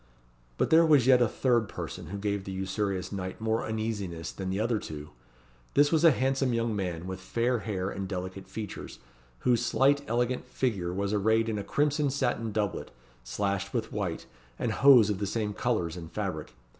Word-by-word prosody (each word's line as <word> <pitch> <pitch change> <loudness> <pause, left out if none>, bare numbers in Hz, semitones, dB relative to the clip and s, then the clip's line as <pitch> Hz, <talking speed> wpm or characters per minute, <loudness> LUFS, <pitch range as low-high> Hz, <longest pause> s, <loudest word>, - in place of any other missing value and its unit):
But - - +1
there 165 +1 +7
was 150 -6 +5
yet 125 -1 +6
a 120 - +5
third 120 -2 +1
person, 85 0 -6
who 100 +5 -5
gave 100 -1 -2
the 95 - -6
usurious 95 0 -2
knight 95 0 -5
more 110 0 0
uneasiness 105 -7 -3
than 95 -1 -5
the 95 +2 -1
other 115 0 +1
two. 75 -4 -8 0.6
This 145 +1 +5
was 160 -1 +3
a 165 - +9
handsome 135 -2 +1
young 115 -1 0
man, 90 -4 -3
with 95 0 -5
fair 120 +5 0
hair 95 -3 -3
and 95 -1 -4
delicate 95 0 -5
features, 110 -3 -7 0.4
whose 120 -1 +2
slight 140 +3 +3
elegant 120 +2 0
figure 100 -9 -1
was 100 +2 -1
arrayed 110 +2 +2
in 105 -2 -1
a - - -3
crimson 145 +2 +1
satin 115 -4 -1
doublet, 105 -2 -2 0.3
slashed 100 - -2
with 115 -2 -2
white, 95 -6 -3 0.3
and - - -1
hose 125 -7 +6
of 100 - -3
the 100 - -1
same 105 0 -2
colours 100 -9 -1
and 85 -2 -8
fabric. 95 -11 -4
105 Hz, 185 wpm, -29 LUFS, 95-120 Hz, 0.6 s, a